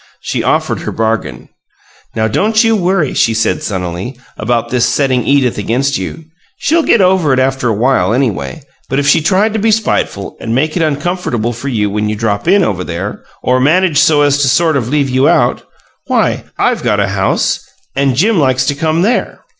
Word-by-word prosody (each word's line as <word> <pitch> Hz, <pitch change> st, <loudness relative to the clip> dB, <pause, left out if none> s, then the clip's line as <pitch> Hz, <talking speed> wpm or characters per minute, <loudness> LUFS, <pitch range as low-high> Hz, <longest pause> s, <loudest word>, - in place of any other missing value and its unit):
She -, -, -2 dB
offered -, -, 0 dB
her -, -, -5 dB
bargain. 110 Hz, 0 st, -2 dB, 0.7 s
"Now 110 Hz, 0 st, +1 dB
don't 215 Hz, -, +2 dB
you 225 Hz, -1 st, +3 dB
worry," 180 Hz, -6 st, 0 dB
she 115 Hz, -, +1 dB
said, 115 Hz, -, 0 dB
sunnily, 95 Hz, +5 st, -4 dB, 0.2 s
"about 115 Hz, +1 st, -1 dB
this 125 Hz, -2 st, +1 dB
setting 130 Hz, -3 st, 0 dB
Edith 135 Hz, -5 st, +2 dB
against 130 Hz, +5 st, 0 dB
you. 125 Hz, -, -6 dB, 0.3 s
She'll 330 Hz, +5 st, +1 dB
get 235 Hz, -, +3 dB
over 180 Hz, -6 st, +3 dB
it 130 Hz, -, +2 dB
after 130 Hz, -1 st, 0 dB
a -, -, +1 dB
while, 110 Hz, -4 st, +1 dB
anyway, 110 Hz, -, -2 dB, 0.3 s
but 135 Hz, -, -1 dB
if 140 Hz, 0 st, 0 dB
she 160 Hz, +3 st, +4 dB
tried 195 Hz, +7 st, +1 dB
to 220 Hz, -, -1 dB
be 225 Hz, +2 st, +1 dB
spiteful 210 Hz, -, -1 dB
and 115 Hz, 0 st, -3 dB
make 155 Hz, +4 st, 0 dB
it 175 Hz, -, 0 dB
uncomfortable 145 Hz, -6 st, -1 dB
for 120 Hz, +5 st, -7 dB
you 110 Hz, -6 st, 0 dB
when 105 Hz, +1 st, -1 dB
you 105 Hz, -, -2 dB
drop 105 Hz, +2 st, -2 dB
in 195 Hz, +2 st, +4 dB
over 95 Hz, -, -1 dB
there, 90 Hz, +4 st, -5 dB, 0.2 s
or 125 Hz, 0 st, +2 dB
managed 155 Hz, +3 st, +2 dB
so 150 Hz, -2 st, +4 dB
as 145 Hz, 0 st, +2 dB
to 140 Hz, -, +2 dB
sort 160 Hz, +4 st, +2 dB
of 125 Hz, -4 st, -1 dB
leave 145 Hz, -1 st, +1 dB
you 130 Hz, +1 st, +2 dB
out, -, -, +2 dB, 0.5 s
why, -, -, 0 dB
I've -, -, +1 dB
got -, -, 0 dB
a -, -, +1 dB
house, -, -, 0 dB, 0.4 s
and 135 Hz, -1 st, +1 dB
Jim 195 Hz, -, +2 dB
likes 130 Hz, -2 st, +1 dB
to 145 Hz, -, +1 dB
come 160 Hz, +3 st, 0 dB
there. 235 Hz, +5 st, -1 dB
135 Hz, 200 wpm, -13 LUFS, 115-165 Hz, 0.7 s, she